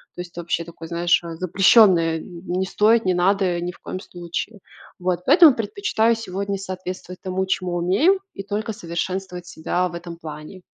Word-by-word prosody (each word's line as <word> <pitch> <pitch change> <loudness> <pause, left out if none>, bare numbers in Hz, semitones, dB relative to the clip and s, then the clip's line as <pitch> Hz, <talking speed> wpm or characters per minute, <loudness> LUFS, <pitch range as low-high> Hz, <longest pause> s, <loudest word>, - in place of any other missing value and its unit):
То - - -12
есть 175 -1 -11
вообще 170 0 -2
такое 165 -1 -10
знаешь, 170 0 +2
э, 165 -1 -6
запрещенное 185 -2 +5
не 180 +1 -4
стоит, 220 +3 +3
не 185 - +2
надо 180 -1 +1
ни 175 +1 -3
в - - -19
коем 185 - -6
случае. 175 +4 -6 0.4
Вот, 180 -1 -1
поэтому 330 -4 +8
предпочитаю 230 - +1
сегодня 200 -2 -3
соответствовать 185 -1 -7
тому, 190 0 -2
чему 185 -2 -1
умею 205 - +3
и 195 - -7
только 210 +2 -3
совершенствовать 180 -1 -4
себя 180 +2 -1
в - - -12
этом 170 0 -8
плане. 155 +3 -9
185 Hz, 165 wpm, -22 LUFS, 175-200 Hz, 0.4 s, поэтому